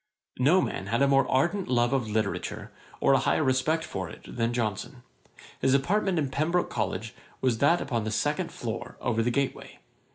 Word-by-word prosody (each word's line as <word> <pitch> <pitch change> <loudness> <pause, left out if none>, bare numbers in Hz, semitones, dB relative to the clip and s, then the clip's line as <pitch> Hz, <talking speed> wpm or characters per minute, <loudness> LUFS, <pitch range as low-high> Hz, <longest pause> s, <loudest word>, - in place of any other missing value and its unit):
No 155 +9 +5
man 95 - -4
had 115 +6 +2
a - - +4
more 135 0 +3
ardent 175 +9 +1
love 120 0 +2
of 125 -5 0
literature, 110 0 -2 0.3
or - - +4
a 135 - +5
higher 145 - +1
respect 145 +5 +1
for 95 - -5
it - - -12
than 115 -1 0
Johnson. 120 +2 -3 0.6
His 135 0 +3
apartment 185 +6 +1
in 145 -4 0
Pembroke 165 +6 0
College 110 0 -3 0.3
was 125 -4 +1
that 170 +5 +4
upon 120 -5 -1
the - - -1
second 150 +9 -1
floor, 115 -1 -6
over 115 -2 0
the 115 - +1
gateway. 140 +2 -2
130 Hz, 185 wpm, -27 LUFS, 115-150 Hz, 0.6 s, No